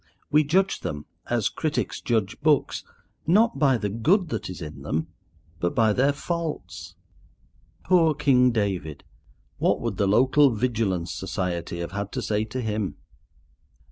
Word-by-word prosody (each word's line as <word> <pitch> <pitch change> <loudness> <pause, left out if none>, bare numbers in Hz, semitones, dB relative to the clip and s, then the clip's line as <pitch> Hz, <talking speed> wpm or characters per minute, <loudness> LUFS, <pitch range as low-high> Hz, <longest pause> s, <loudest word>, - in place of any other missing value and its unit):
We 150 +1 +5
judge 185 +6 +1
them, 75 0 -5 0.2
as - - +1
critics - - -2
judge 110 -2 -1
books, 150 -1 +2 0.4
not 220 +7 +3
by 135 -4 +4
the 105 -2 -2
good 160 - +2
that - - -4
is 90 - -7
in 75 -2 -8
them, 80 +2 -2 0.5
but 90 - -1
by 110 -2 +4
their 135 +6 +3
faults. 95 - -5 0.9
Poor 165 -4 +4
King 130 -4 +4
David! 95 - -2 0.6
What - - +2
would 115 -5 -3
the 100 - +2
local 130 +7 +5
Vigilance 105 -7 -1
Society 90 -2 -3
have 85 - -5
had 100 0 -4
to - - -2
say 105 0 0
to 125 +4 -4
him? 105 -4 -2
110 Hz, 145 wpm, -25 LUFS, 95-145 Hz, 0.9 s, We